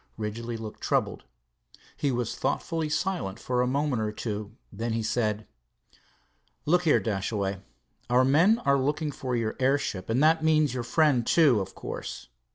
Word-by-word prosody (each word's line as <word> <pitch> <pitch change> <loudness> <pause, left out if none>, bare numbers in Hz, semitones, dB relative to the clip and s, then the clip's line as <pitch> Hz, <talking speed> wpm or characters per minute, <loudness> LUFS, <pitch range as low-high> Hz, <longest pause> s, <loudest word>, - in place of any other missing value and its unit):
Ridgely 115 +2 -4
looked 110 -1 -8
troubled. - - -1 0.7
He 140 - 0
was 120 -2 -2
thoughtfully, 165 -3 -2
silent 150 - -2
for 125 -1 0
a 125 - +1
moment 140 -2 0
or 105 -1 -1
two. 105 -1 -5 0.2
Then 115 +3 -3
he 115 0 -1
said: 110 -2 -1 1.2
"Look 175 +3 +2
here, 155 - +5
Dashaway, 100 -2 -2 0.5
our 125 +1 +4
men 165 - +5
are 140 0 +4
looking 145 +3 -1
for 130 -2 -3
your 115 -2 -1
airship, 130 -8 0
and 125 +6 +2
that 160 +1 +4
means 155 -4 +3
your 125 - -2
friend, 140 0 +2
too, 140 -3 +4
of 95 - -5
course. - - -7
125 Hz, 160 wpm, -27 LUFS, 110-150 Hz, 1.2 s, here